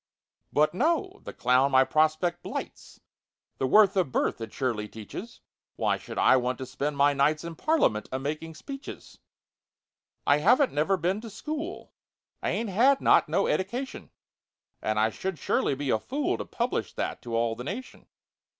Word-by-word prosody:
But 150 +2 +3
no—the 340 - -1
clown 125 +2 +3
my 130 -1 +6
prospect 155 +4 +1
blights— - - -7 0.6
(The 130 - +1
worth 205 +5 +5
of 180 -8 +1
birth - - 0
it 115 - -6
surely 115 -6 -2
teaches!) 110 - -9 0.3
"Why - - 0
should - - -9
I 130 - +5
want 125 0 -1
to 130 - -5
spend 145 +3 -3
my 145 +1 +4
nights 150 +3 +2
In 170 0 -6
Parliament, 165 - +1
a 130 - -1
making 155 +4 -4
speeches? 275 - -9 1.1
"I 145 - +5
haven't 245 - +4
never 160 +7 +2
been 185 +4 -1
to 230 - -8
school— 305 - -6 0.5
I - - -1
ain't 230 -2 -1
had 260 +8 +4
not - - +4
no - - +2
eddication— 240 +8 -3 0.7
And 110 0 0
I 110 +1 +3
should 190 +5 -4
surely 140 - 0
be 140 -1 -2
a 110 - +2
fool 280 - -1
To - - -4
publish 240 +1 -2
that - - -3
to 115 -1 -5
all 115 0 +1
the 125 - -7
nation!" 215 - -7
155 Hz, 170 wpm, -27 LUFS, -, 1.1 s, my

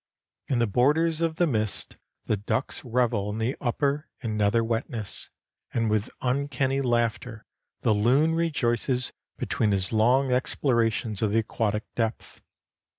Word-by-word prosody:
In 130 - +1
the 120 - +3
borders 150 +9 +2
of 165 -1 0
the 175 - +3
mist 110 -8 -1 0.3
the - - +1
ducks 110 +6 -2
revel 115 -4 0
in 105 - -4
the 115 +4 -1
upper 140 +3 0
and 110 -2 -2
nether 105 +2 +2
wetness, 115 -1 -3 0.5
and 115 -2 +1
with 110 +2 0
uncanny 135 +1 0
laughter 120 -2 -1 0.4
the 110 - +3
loon 130 +10 +3
rejoices 130 -6 0 0.2
between 110 - 0
his 95 +1 +2
long 125 +5 +3
explorations 115 -5 0
of 110 -2 +1
the - - +3
aquatic 110 -1 0
depth. 115 -1 -3
120 Hz, 140 wpm, -26 LUFS, 110-135 Hz, 0.5 s, the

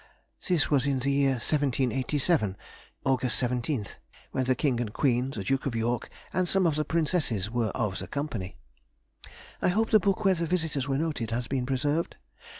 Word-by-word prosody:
This 175 -6 +2
was 140 -2 +3
in 140 -1 +1
the 135 +2 0
year 140 -1 +3
1787, 135 - +1 0.5
August 130 -3 +1
17th, 125 -2 -1 0.3
when 130 - 0
the 130 0 +2
King 130 -4 +1
and 115 -4 -2
Queen, 125 +1 +1
the 110 -7 -5
Duke 135 +6 0
of 125 - -2
York 115 +1 -1 0.2
and 185 -1 +1
some 190 +1 +3
of 165 - +3
the 155 +1 0
Princesses 150 - 0
were 120 -2 0
of 105 -4 -1
the - - -6
company. 120 -10 -4 1.0
I - - +2
hope 220 +5 +1
the 215 - +7
book 200 +1 0
where 190 - +6
the 170 -2 -2
visitors 160 -6 0
were 135 -1 +1
noted, 150 -7 -2
has 120 +1 -2
been 130 -2 -1
preserved? 145 +5 0
135 Hz, 180 wpm, -28 LUFS, 120-155 Hz, 1.0 s, the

